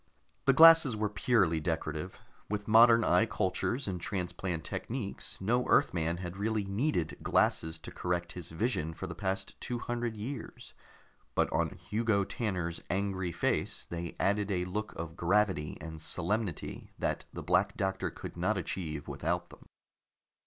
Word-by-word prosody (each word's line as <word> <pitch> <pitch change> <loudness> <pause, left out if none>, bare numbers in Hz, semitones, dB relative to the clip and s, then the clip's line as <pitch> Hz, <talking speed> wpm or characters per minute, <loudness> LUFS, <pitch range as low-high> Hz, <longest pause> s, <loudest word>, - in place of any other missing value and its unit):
The 135 - +6
glasses 165 -4 +8
were 105 0 0
purely 95 -5 +2
decorative; 80 +1 -3 0.3
with 105 0 -3
modern 115 +1 +7
eye 110 - +4
cultures 110 +6 -1
and 90 -3 -3
transplant 90 -3 -3
techniques, 115 - -4
no 120 +6 +1
Earthman 85 -1 +2
had 90 +1 -6
really 110 +1 0
needed 100 - -1
glasses 80 0 +2
to 80 - -9
correct 85 -1 -2
his 85 -2 -7
vision 80 -3 -1
for - - -5
the - - -5
past 95 0 -3
two 120 - -2
hundred 120 -1 -3
years, 130 +7 -7 0.6
but - - +2
on - - 0
Hugo 110 -2 +1
Tanner's 90 -6 -3
angry 95 -2 -1
face - - -1
they 85 -1 -5
added 100 +1 +1
a 90 -3 0
look 105 +4 -3
of 85 0 -6
gravity 90 -3 +1
and 80 0 -8
solemnity 90 +2 -2
that - - -1
the - - -7
Black - - +2
Doctor 95 0 -1
could - - -8
not - - +1
achieve 80 -5 -4
without - - -2
them. - - -15
95 Hz, 150 wpm, -31 LUFS, 85-110 Hz, 0.6 s, glasses